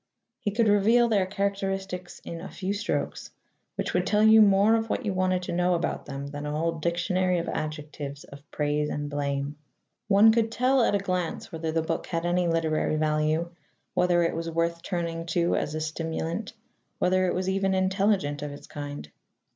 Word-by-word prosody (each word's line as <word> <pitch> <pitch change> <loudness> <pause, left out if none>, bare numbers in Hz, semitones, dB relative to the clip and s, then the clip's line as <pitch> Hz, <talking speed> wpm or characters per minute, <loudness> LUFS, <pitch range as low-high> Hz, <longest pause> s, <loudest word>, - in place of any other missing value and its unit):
He 205 - -1
could 220 +2 +2
reveal 220 +4 +4
their 200 -5 +2
characteristics 195 -2 -3
in 165 0 -6
a 190 - -7
few 195 0 -3
strokes, 205 +2 -3 0.5
which - - -2
would - - +1
tell 210 0 +3
you 220 0 +8
more 200 +1 +5
of 225 0 +1
what 255 - -2
you 205 - 0
wanted 185 0 +1
to 175 - -4
know 180 +1 +2
about 170 - -2
them 140 0 -5
than 145 +1 -6
a - - -2
whole 165 +2 -1
dictionary 180 +2 +1
of 170 - -2
adjectives 150 -2 -5
of 140 0 -12
praise 150 0 0
and 145 0 -4
blame. 140 0 -2 0.5
One 210 +2 +7
could 225 0 +1
tell 255 +3 +3
at 215 - +3
a - - +4
glance 185 -3 -3
whether 160 -1 -3
the 160 0 0
book - - -3
had 165 -1 -2
any 175 0 +1
literary 160 -2 +1
value, 155 +2 +1 0.4
whether 175 -1 +3
it 165 - +1
was 165 0 -3
worth 170 +1 -1
turning 170 -2 -3
to 170 0 +1
as 150 - -2
a - - -1
stimulant, 160 +5 -3 0.4
whether 185 +1 +2
it - - 0
was 185 +1 -2
even 195 0 +1
intelligent 190 -6 +1
of 145 -1 -4
its 145 - -10
kind. 145 - -7
175 Hz, 190 wpm, -27 LUFS, 155-195 Hz, 0.5 s, you